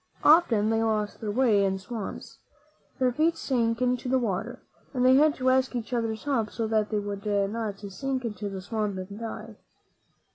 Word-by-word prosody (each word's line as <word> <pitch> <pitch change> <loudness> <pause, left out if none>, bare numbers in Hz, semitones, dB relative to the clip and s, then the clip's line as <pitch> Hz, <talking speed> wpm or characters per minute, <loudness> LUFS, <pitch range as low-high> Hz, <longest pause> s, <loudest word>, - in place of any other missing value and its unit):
Often 235 -10 +5
they 225 0 +2
lost 215 -2 -1
their 215 - -3
way 215 -3 +3
in 190 -1 +1
swamps. 200 +2 -7 0.6
Their 255 -2 +2
feet 315 +6 +1
sank 235 -2 0
into 250 0 0
the 260 - +3
water, 230 +1 -3 0.3
and 250 0 +2
they 255 - +7
had 295 +2 +5
to 255 0 +2
ask 260 0 +1
each 240 +1 -4
other's 225 -2 -1
help 255 -7 0
so 230 - -3
that 215 -1 +1
they 215 - -1
would 205 -1 -4
not 205 +1 -1
sink 255 +6 -3
into 210 -2 -4
the 190 -1 -6
swamp 210 -1 -2
and 195 +3 -7
die. 225 -1 -7
225 Hz, 185 wpm, -27 LUFS, 205-255 Hz, 0.6 s, they